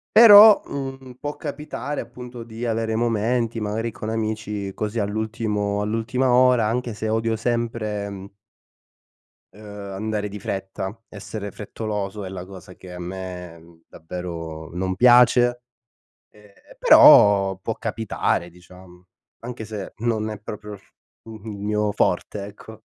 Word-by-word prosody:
Però, 215 -2 +10
uhm, 135 -2 -7
può 145 0 -5
capitare 150 0 -5
appunto 125 -1 -10
di 115 +1 -7
avere 115 -1 -1
momenti, 115 +1 0
magari 110 +2 -2
con 110 - -6
amici 110 -3 -3
così 105 +3 -4
all'ultimo 105 -1 -2
all'ultima 115 +5 0
ora, 125 -2 +4
anche 120 +1 -2
se 110 +1 -3
odio 115 +1 0
sempre 115 -3 -2
mhmm 100 -1 -9 1.2
ehm, 105 - -15 0.3
andare 105 +1 -3
di 105 +1 -8
fretta, 95 +1 -5
essere 100 0 -7
frettoloso 105 -1 -5
è 95 - -6
la 95 -1 -7
cosa 95 -1 -12
che 90 -1 -12
a 90 - -8
me 90 -2 -8
davvero 80 -2 -7
non 95 +1 -2
piace, 120 +1 +5 0.7
ehm, 105 -1 -20 0.3
però 100 -2 +7
può 110 +4 -4
capitare, 110 -5 -2
diciamo, 90 0 -17 0.3
anche 120 -1 -7
se 105 -3 -7
non 110 -1 -1
è 105 - -6
proprio 105 0 -8
il - - -11
f - - -31 0.3
il 110 -1 -10
mio 105 +1 -1
forte, 100 0 -1
ecco. 110 +2 -12
105 Hz, 135 wpm, -23 LUFS, 100-115 Hz, 1.2 s, Però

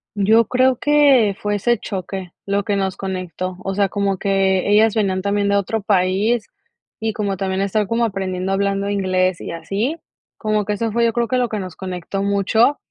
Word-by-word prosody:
Yo 220 +3 +4
creo 255 +1 +3
que 275 -9 +4
fue 205 0 0
ese 235 +3 +1
choque 190 -2 -6
lo 200 0 0
que 205 0 -1
nos 190 -1 -1
conectó. 185 -1 -4
O 195 - -2
sea, 200 0 +1
como 200 -1 -1
que 195 -1 +1
ellas 215 +1 +5
venían 195 -4 0
también 200 0 +1
de 200 - +2
otro 200 +2 0
país 205 +4 +1 0.5
y 220 0 -2
como 200 -2 -2
también 190 0 -2
estar 200 +1 0
como 230 +2 +1
aprendiendo 190 -2 -3
hablando 200 0 0
inglés 185 -2 0
y - - -6
así, 205 - -2 0.4
como 215 -1 0
que 210 - -1
eso 225 +2 -2
fue 235 +2 +1
yo 230 -1 +2
creo 235 0 0
que 255 +3 0
lo 245 -2 +1
que 215 - -3
nos 185 -3 -6
conectó 185 +1 -5
mucho. 200 +7 +2
200 Hz, 195 wpm, -20 LUFS, 190-220 Hz, 0.5 s, ellas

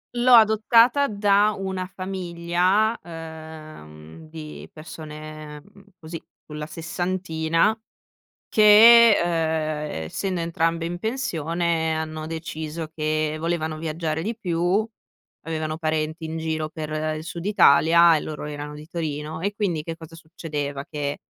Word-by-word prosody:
L'ho 245 +1 +4
adottata 230 +5 +5
da 205 0 +3
una 190 -1 -4
famiglia, 185 +3 0
ehm, 155 - -11
di 155 -1 -9
persone 155 -1 -9 0.4
così, 165 0 -7 0.3
sulla 150 0 -6
sessantina 170 +3 -1 0.7
che, 225 +1 +8
ehm, 155 - -1
essendo 185 - -3
entrambe 165 0 -1
in 175 +1 -4
pensione 170 - -1
hanno 155 0 -4
deciso 160 -1 -5
che 155 0 -1
volevano 160 -1 -2
viaggiare 160 0 -3
di 220 +4 -4
più, 180 +2 0 0.6
avevano 155 -1 -3
parenti 155 0 -2
in 160 +1 -4
giro 160 -1 -2
per 155 -1 -6 0.2
il 155 - -6
sud 170 +2 -7
Italia 170 -3 +5
e 150 - 0
loro 150 -1 -6
erano 150 0 -6
di 150 +1 -10
Torino. 160 -2 -4
E 205 +2 -2
quindi 180 -8 -1
che 165 +1 -6
cosa 165 0 -12
succedeva? 150 -4 -5
Che 145 -2 -3
165 Hz, 120 wpm, -23 LUFS, 155-185 Hz, 0.7 s, che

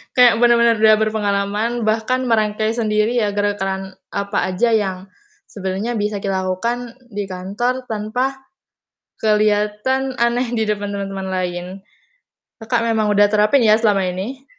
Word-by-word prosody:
Kayak, 245 -2 +6
bener-bener 235 -1 +4
udah 215 0 +6
berpengalaman, 215 +2 -1
bahkan 220 +4 0
merangkai 215 -1 +1
sendiri 215 +1 +1
ya, 210 -3 +1
gerakan 195 -2 -2 0.2
apa 200 +1 -2 0.2
aja 235 +6 +2
yang 205 -5 +1 0.5
sebenarnya 200 +4 -3
bisa 210 -1 -2
dilakukan 200 +5 -2 0.2
di 205 -2 -4
kantor, 200 +8 -3
tanpa 225 +5 -2 0.8
kelihatan 215 +5 +1
aneh 240 +1 +2
di 225 -2 +1
depan 205 -1 -2
teman-teman 195 -1 -4
lain. 180 -1 -3 1.0
Kakak, 225 +1 0
memang 220 -2 +1
udah 205 0 +5
terapin 215 +5 +3
ya 215 -1 +6
selama 205 -4 +2
ini? 245 +9 -6
215 Hz, 130 wpm, -19 LUFS, 200-235 Hz, 1.0 s, Kayak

